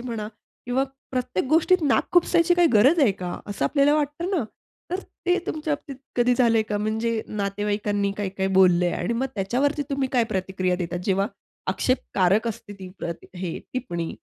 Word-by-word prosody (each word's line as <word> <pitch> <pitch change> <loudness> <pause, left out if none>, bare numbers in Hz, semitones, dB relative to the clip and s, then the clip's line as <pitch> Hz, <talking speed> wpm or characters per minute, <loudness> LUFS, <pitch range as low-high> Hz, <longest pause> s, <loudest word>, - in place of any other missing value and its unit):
म्हणा, 230 -4 -4 0.4
किंवा 255 +2 +1 0.3
प्रत्येक 250 -8 -1
गोष्टीत 335 +3 +4
नाक 285 -3 +2
खुपसायची, 350 0 +4
काय 350 0 +5
गरज 260 +10 +5
आहे 240 -9 +5
का? 180 -1 -4
असं 205 - -2
आपल्याला 285 0 +3
वाटतं 300 +4 -1
ना. 355 -9 +1 0.5
तर 365 - -1 0.3
ते 360 +1 +3
तुमच्याबाबतीत 300 -3 -3 0.2
कधी 245 0 +4
झालंय 230 -3 +3
का? 210 -1 -3
म्हणजे 220 +1 -1
नातेवाईकांनी 205 0 -1
काय-काय 195 -1 -2
बोललंय, 180 -2 +5
आणि - - -1
मग 255 +3 0
त्याच्यावरती 265 +9 0
तुम्ही 275 -1 0
काय 245 -3 +3
प्रतिक्रिया 185 -1 -1
देतात, 175 -1 -3
जेव्हा 195 0 +2 0.4
आक्षेपकारक 205 -4 +1
असते 205 -1 -7
ती 185 - -7
प्रति 170 -1 -5 0.2
हे 170 -3 -3
टिप्पणी? 175 -10 -3
230 Hz, 160 wpm, -24 LUFS, 195-280 Hz, 0.5 s, काय